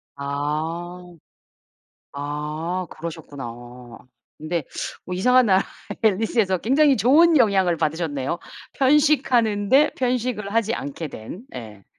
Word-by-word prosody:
아. 155 +5 -3 1.1
아 150 +5 -4
그러셨구나. 155 -5 -7 0.9
근데 155 -1 -3 0.4
뭐 180 - -5
이상한 250 +6 +4
나라의 190 -1 +4 0.4
엘리스에서 210 -2 +2
굉장히 275 - +3
좋은 320 +6 +5
영향을 190 -8 +3
받으셨네요. 155 -1 -2 0.4
편식하는데 265 -4 +3
편식을 245 -5 -1
하지 230 0 +1
않게 145 +3 -5
된. 135 - -9
예. 105 -5 -9
185 Hz, 240 characters per minute, -23 LUFS, 155-240 Hz, 1.1 s, 좋은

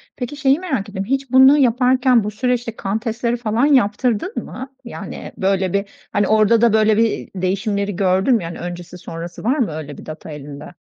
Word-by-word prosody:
Peki 250 +2 -5
şeyi 275 +1 +3
merak 265 - -3
ettim, 195 -1 -4
hiç 270 +1 -2
bunu 265 +3 +7
yaparken 250 -2 +3
bu 210 - -3
süreçte 240 0 -1
kan 200 +1 -2
testleri 235 +1 -2
falan 230 +2 +1
yaptırdın 250 - +1
mı? 265 +1 -9
Yani - - -8
böyle 190 -1 0
bir, 200 0 -1 0.2
hani, 205 -1 +1
orada 215 +1 +4
da 235 -2 +4
böyle 215 -1 +4
bir 225 -1 0
değişimleri 200 +2 -1
gördün 190 +6 +2
mü? 215 - -1
Yani 165 0 -6
öncesi 175 0 -7
sonrası 170 0 -8
var 255 +7 +1
mı 225 -10 +1
öyle 150 -2 -7
bir - - -11
data 155 0 -8
elinde? 145 +3 -9
215 Hz, 190 wpm, -19 LUFS, 190-250 Hz, 0.2 s, bunu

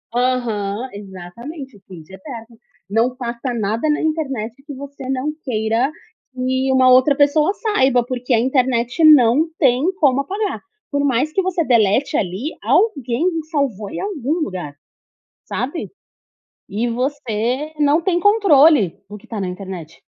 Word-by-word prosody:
Aham, 240 -3 -1
exatamente, 210 - -9
o - - -23
print 180 -3 -13
é - - -6
eterno. 230 -2 -10 0.3
Não 230 +5 +1
posta 245 0 -4
nada 225 +5 -1
na 300 - +1
internet 275 -6 -3
que 295 - -7
você 275 -1 -9
não 270 +3 -1
queira 225 +2 0 0.4
que 260 +1 -1
uma 260 -1 +5
outra 255 +3 +5
pessoa 300 +5 +3
saiba, 265 - +2
porque 250 0 -2
a 230 - +4
internet 255 +2 +1
não 295 0 +6
tem 260 -3 +3 0.2
como 275 -3 +3
apagar. 385 - -3 0.3
Por 285 -1 -1
mais 280 +3 +1
que 385 - +2
você 365 -3 -1
delete 235 +1 +2
ali, 200 - -2
alguém 280 - +1 0.2
já 310 - -21
salvou 220 -8 -1
em - - -6
algum 310 - -2
lugar, 180 - -5 0.7
sabe? 285 +7 -4 0.8
E 225 +4 -2
você 250 +2 -2
não 295 +2 +4
tem 350 0 0
controle 320 - +4
do 210 - -7
que 230 - -20
tá 225 -3 -5
na 190 - -2
internet. 180 -3 -8
255 Hz, 150 wpm, -19 LUFS, 225-290 Hz, 0.8 s, não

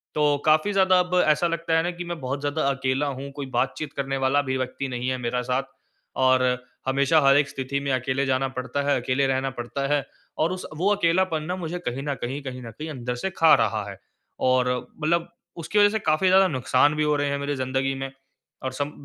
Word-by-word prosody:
तो, 150 -1 +3
काफ़ी 155 +6 +4
ज़्यादा 190 -1 +4
अब 180 0 0
ऐसा 155 +3 +3
लगता 165 -1 0
है 165 - +2
ना 175 - -1
कि 175 0 -7
मैं 170 -1 -5
बहुत 135 +2 -3
ज़्यादा 145 +2 -1
अकेला 135 +1 0
हूँ, 140 +1 -5
कोई 140 0 -6
बातचीत 135 +4 -1
करने 135 -1 -2
वाला 140 +2 +3
भी 130 - 0
व्यक्ति 130 +1 -3
नहीं 125 0 -4
है 130 - -1
मेरा 125 0 -2
साथ 125 +2 -1 0.6
और 130 0 +4 0.4
हमेशा 140 +4 +3
हर 140 0 +5
एक 145 -1 +2
स्थिति 135 +1 -3
में 140 0 -2
अकेले 130 +2 0
जाना 135 0 +1
पड़ता 130 +3 -2
है, 140 - +3
अकेले 130 +2 +1
रहना 135 0 0
पड़ता 135 +2 -4
है 145 -2 0 0.3
और 165 +3 +1
उस 185 - -5
वो 185 +5 +2
अकेलापन 170 -3 +1
ना 180 +3 -3
मुझे 175 -1 -4
कहीं 130 -3 -4
न 145 -1 -1
कहीं 135 +4 -3
कहीं 130 -1 -6
न 115 - -8
कहीं 155 +1 -6
अंदर 125 -4 -4
से 190 +10 -3
खा 165 -1 +6
रहा 110 -2 0
है। 100 - -10 0.5
और 130 0 +3 0.3
मतलब 170 +2 0 0.3
उसकी 170 +6 0
वज़ह 205 - +7
से 220 +1 -1
काफ़ी 155 0 +1
ज़्यादा 190 +1 +6
नुकसान 135 0 +2
भी 155 - +1
हो 150 0 +2
रहे 145 0 0
हैं 140 - -1
मेरी 140 +1 -2
ज़िंदगी 130 +1 -1
में, 135 0 -5 0.5
और 130 - -2
सम 145 +2 -3
140 Hz, 225 wpm, -24 LUFS, 130-160 Hz, 0.6 s, वज़ह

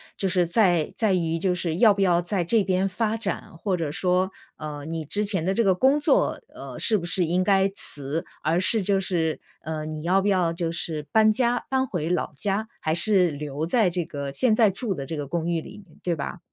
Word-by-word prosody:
就 195 - -1
是 180 -1 +2
在 175 -4 +2
在 215 -4 +1
于 165 -2 0
就 180 +1 +1
是 170 -2 -2
要 210 +3 +6
不 200 - -8
要 175 -3 +3
在 175 -1 -2
这 220 +3 +2
边 190 0 +1
发 220 +3 -1
展， 195 -5 -5
或 195 +1 -1
者 165 -4 -3
说， 180 +3 0 0.2
呃， 150 -1 -7
你 160 0 -4
之 205 +8 0
前 190 -5 -1
的 190 +2 0
这 230 - +1
个 190 - +4
工 270 +9 +3
作， 290 - +2 0.2
呃， - - -8
是 220 - +4
不 175 - -6
是 180 0 +1
应 180 +3 +1
该 195 0 +3
辞？ 145 0 -2 0.2
而 165 +4 +1
是 220 +2 +2
就 195 0 +1
是， 165 -4 -1 0.2
呃， 155 -1 -4
你 155 -1 -5
要 190 +3 +3
不 205 - +1
要 180 -4 +2
就 165 -1 -2
是 160 -3 -3
搬 220 0 +5
家， 245 0 +1
搬 265 0 +1
回 175 -8 -3
老 180 -3 -1
家， 205 +7 -2
还 155 +1 -1
是 180 -1 +3
留 145 +1 -4
在 200 +1 +2
这 175 -1 -2
个 140 -1 -5
现 220 - +3
在 220 -3 +5
住 195 +2 -2
的 135 -2 -5
这 160 +2 -5
个 145 -2 -4
公 170 +1 -2
寓 170 -1 0
里， 200 +5 -11 0.2
对 175 -2 -1
吧？ 165 +4 -5
180 Hz, 245 characters per minute, -25 LUFS, 160-200 Hz, 0.2 s, 要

